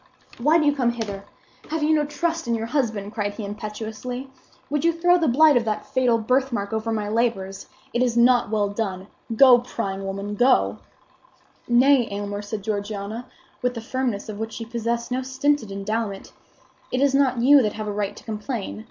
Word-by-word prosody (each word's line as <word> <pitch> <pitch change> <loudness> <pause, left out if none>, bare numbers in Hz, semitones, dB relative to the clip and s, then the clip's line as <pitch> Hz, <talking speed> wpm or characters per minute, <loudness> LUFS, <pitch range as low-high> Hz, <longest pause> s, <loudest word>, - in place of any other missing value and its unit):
"Why 300 +7 +4
do 310 - +2
you 290 -1 +3
come 250 -4 +2
hither? 205 -4 -5 0.4
Have 315 -1 -1
you 310 +1 +3
no 300 -1 +2
trust 330 -1 -2
in 235 - +1
your 225 0 -3
husband?" 225 -5 -2
cried 205 -2 -2
he, 210 - -5
impetuously. 220 +5 -6 0.4
"Would 295 0 0
you 335 - +4
throw 350 +2 +3
the 325 - +1
blight 295 +4 +5
of 235 -1 +2
that 215 -1 -2
fatal 255 -3 +2
birthmark 240 -2 0
over 220 +1 -1
my 215 -2 -1
labors? 210 -4 -1 0.3
It 240 - +1
is 240 -2 +1
not 245 -1 +4
well 210 -2 +1
done. 195 -3 -3 0.3
Go, 250 0 +8
prying 200 -5 -4
woman, 200 +1 -4
go!" 250 +5 +3 0.9
"Nay, 250 0 +5
Aylmer," 205 0 -4
said 205 0 -6
Georgiana 210 +2 -4 0.3
with 250 0 0
the - - -3
firmness 240 -3 -2
of 210 -1 -6
which 220 0 -4
she 230 - -6
possessed 235 +1 -3
no 255 +1 0
stinted 265 -3 0
endowment, 200 0 -3 0.6
"it 255 - 0
is 280 0 +3
not 265 -3 +2
you 280 +2 +7
that 210 -3 0
have 215 -1 -5
a - - -1
right 205 -1 -2
to - - -13
complain. 215 -1 -4
230 Hz, 190 wpm, -23 LUFS, 210-260 Hz, 0.9 s, Go